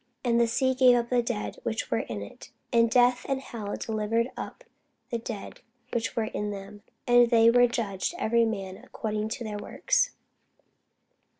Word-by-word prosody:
And 235 -1 +3
the 235 - +4
sea 260 +3 +1
gave 255 -1 +6
up 235 -1 0
the 245 -1 +4
dead 235 -3 -4
which 225 -1 -3
were - - +2
in - - -5
it; - - -12 0.2
and 230 -1 +5
death 245 +1 +4
and 270 -1 0
hell 215 -6 -6
delivered 225 +2 -1
up - - -7 0.5
the 235 - -1
dead 225 -3 -7 0.3
which 230 -1 -1
were 230 - +1
in 210 -1 -3
them: 205 0 -8 0.2
and 245 -1 +5
they 230 -1 +6
were 245 0 +6
judged 220 - -2
every 235 -6 +2
man 195 -4 -3
according 215 -1 -4
to 235 - -4
their 210 -2 -4
works. - - 0
230 Hz, 175 wpm, -27 LUFS, 215-245 Hz, 0.5 s, gave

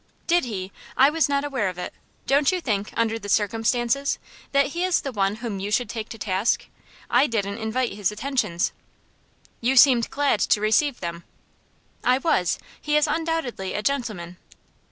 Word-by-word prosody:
"Did 345 -4 +3
he? 195 -5 -5 0.3
I 275 +3 +6
was 320 -1 +2
not 280 0 +1
aware 260 -9 -1
of 180 - -8
it. 180 - -5 0.3
Don't 280 +3 +3
you 370 - 0
think, 210 - -2
under 225 0 +1
the 205 -1 -8
circumstances, 235 +6 +1 0.3
that 280 0 +4
he 345 +4 -2
is 370 -2 +2
the 275 - -4
one 200 -3 0
whom 220 -3 -5
you 200 +2 -3
should 245 +3 0
take 220 -2 -5
to 225 - -8
task? 195 +2 0 0.4
I 290 - +4
didn't 205 -2 -2
invite 235 +3 -1
his 205 -1 0
attentions." 210 -6 -1 0.9
"You 250 +3 +1
seemed 250 -3 +6
glad 280 -6 +1
to 210 - +3
receive 220 +6 +2
them." 170 -1 -5 0.8
"I 250 +1 +4
was. 265 - +1 0.2
He 300 0 +2
is 300 - +4
undoubtedly 320 - -2
a 210 - -2
gentleman." 210 -10 -2
230 Hz, 175 wpm, -24 LUFS, 205-280 Hz, 0.9 s, I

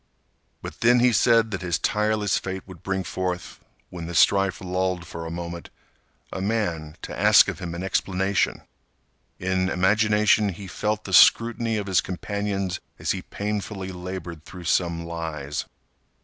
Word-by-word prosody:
But - - -8
then 120 +1 +5
he 125 0 +4
said 115 -1 +4
that 100 - -3
his 90 -2 0
tireless 105 -2 +1
fate 95 0 -6
would 95 -4 -12
bring 95 -1 -2
forth, 90 -1 -4 0.3
when 85 -2 -6
the 85 - -6
strife 100 +2 +4
lulled 90 -1 -2
for 85 0 -7
a - - -5
moment, 85 0 -6 0.6
a 95 - -4
man 85 -8 -2
to - - -6
ask - - +6
of - - -4
him 85 -2 -5
an 85 - -5
explanation. 95 0 0 0.7
In 95 0 0
imagination 105 +2 +3
he 95 +2 -7
felt 105 +3 -2
the 95 - -7
scrutiny 115 +3 +5
of 105 - -3
his 95 -3 +2
companions 100 0 -3 0.2
as - - -1
he - - -2
painfully 100 -2 -4
labored 90 -3 -7
through 90 +1 -10
some 85 0 0
lies. 80 -4 -4
95 Hz, 155 wpm, -24 LUFS, 85-105 Hz, 0.7 s, ask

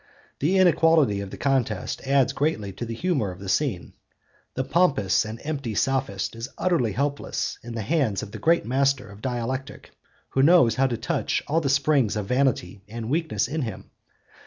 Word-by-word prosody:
The 175 +7 +2
inequality 165 - +4
of 100 - -6
the - - -8
contest 125 -8 -1
adds 135 -2 +3
greatly 115 -10 -1
to 120 - -5
the 115 - -4
humour 140 - 0
of 90 - -8
the 95 +1 -9
scene. 100 - -1 0.6
The 130 - 0
pompous 135 - +2
and 110 +1 -7
empty 140 -8 -3
Sophist 130 -6 -1
is 115 +2 -6
utterly 160 - +1
helpless 140 +5 -2
in 120 0 -8
the 110 - -3
hands 130 - 0
of 105 - -8
the - - -7
great 170 +1 +2
master 135 +2 +1
of 100 +1 -13
dialectic, 130 +2 -4 0.4
who 135 - +1
knows 145 -5 +6
how 135 +1 +2
to 120 -3 -2
touch - - -1
all 160 +3 +1
the 140 - -1
springs 135 -5 +2
of 105 -2 -2
vanity 125 -6 0
and 115 +2 -6
weakness 160 +1 0
in 155 +2 -3
him. 110 -7 -6
130 Hz, 180 wpm, -25 LUFS, 110-145 Hz, 0.6 s, knows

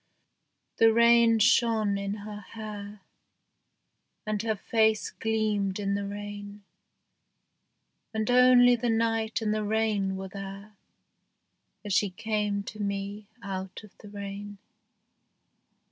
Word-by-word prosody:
The 225 0 +6
rain 235 0 +5
shone 220 -1 +3
in 200 0 -3
her 210 -1 -7
hair, 210 -1 -9 1.2
And 215 -1 -1
her 220 -1 -1
face 220 +1 +1
gleamed 215 -3 -1
in 200 -1 -1
the 200 0 -2
rain; 205 0 -8 1.5
And 220 +1 -1
only 250 0 +6
the 240 0 -2
night 225 0 0
and 215 -1 +1
the 215 0 -1
rain 210 -3 0
were 190 0 -6
there 195 +2 -9 1.1
As 205 - -2
she 205 +1 +2
came 205 +1 -2
to 215 - -9
me 200 0 -4 0.2
out 190 0 -6
of 210 - -16
the 210 - -12
rain. 200 0 -7
210 Hz, 115 wpm, -28 LUFS, 200-220 Hz, 1.5 s, The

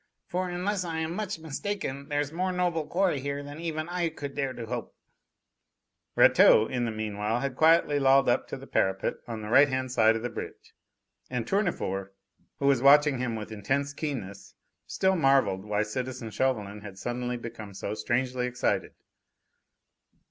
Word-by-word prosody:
"For, 180 +1 -2
unless 185 +2 -1
I 165 -2 -4
am 160 +1 -2
much 205 -1 -3
mistaken, 160 -3 -4
there's 145 -1 -1
more 185 +2 -1
noble 175 -4 -1
quarry 180 -5 +1
here 140 +1 -4
than 145 +2 -9
even 160 -1 -3
I 175 -1 -1
could 145 -3 -7
dare 135 -2 -1
to 120 -2 -7
hope!" 120 +1 -5 1.2
Rateau 110 - +6
in 120 +1 -2
the 115 - -2
meanwhile 110 +1 -2
had 135 -2 -2
quietly 160 -1 +4
lolled 135 0 +5
up - - +2
to - - -5
the - - -11
parapet 95 0 0
on 115 -2 -5
the 105 - -6
right 140 +5 +6
hand 130 -1 -2
side 110 -2 +4
of 115 - -4
the 120 - -2
bridge, - - -8 0.6
and 125 -3 -2
Tournefort, 100 - -1 0.4
who 140 - -2
was 140 -3 +4
watching 145 0 +6
him 120 -2 -2
with 110 0 -6
intense 135 +7 -1
keenness, 125 -11 -6 0.3
still 190 0 +1
marvelled 135 - +2
why 105 0 0
citizen 125 +1 -5
Chauvelin 105 -3 -1
had 100 -2 -10
suddenly 120 +3 -3
become 115 -4 -8
so 100 - -4
strangely 125 +3 -1
excited. 125 0 -1
130 Hz, 170 wpm, -28 LUFS, 110-155 Hz, 1.2 s, Rateau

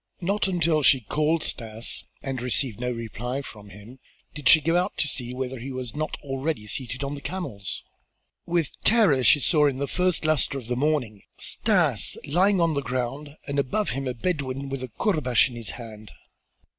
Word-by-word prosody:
Not 200 +3 +1
until 170 -4 +2
she 135 -2 +5
called 155 +8 0
Stas 115 0 -2 0.2
and 135 -3 -3
received 125 -2 -1
no 125 0 -1
reply 120 +3 -4
from 105 -5 -11
him, 105 +7 -13 0.3
did 150 -4 +1
she 160 - +9
go 165 +3 +1
out 180 +3 0
to 150 - +1
see 125 -4 -3
whether 130 0 -4
he 130 +4 -6
was 130 -3 -5
not 155 +1 -3
already 135 -3 -3
seated 125 +4 -4
on 140 +1 -3
the 145 - -7
camels. 125 - -4 0.6
With 170 -3 -1
terror 195 - +4
she 145 - +6
saw 150 +2 +4
in 135 -2 -1
the 140 - -1
first 180 -1 0
luster 155 -3 +2
of 130 - -7
the 125 +2 -2
morning 125 -7 0 0.2
Stas - - +2
lying 185 +6 +3
on 165 -2 +3
the 140 - 0
ground 135 +4 -4
and 140 0 -1
above 170 +10 0
him 135 0 -3
a 125 - -2
Bedouin 135 -2 -2
with 135 -1 -4
a 130 - -4
courbash 130 - +2
in 120 - -10
his 115 -2 -4
hand. 110 -3 -10
135 Hz, 190 wpm, -25 LUFS, 125-155 Hz, 0.6 s, she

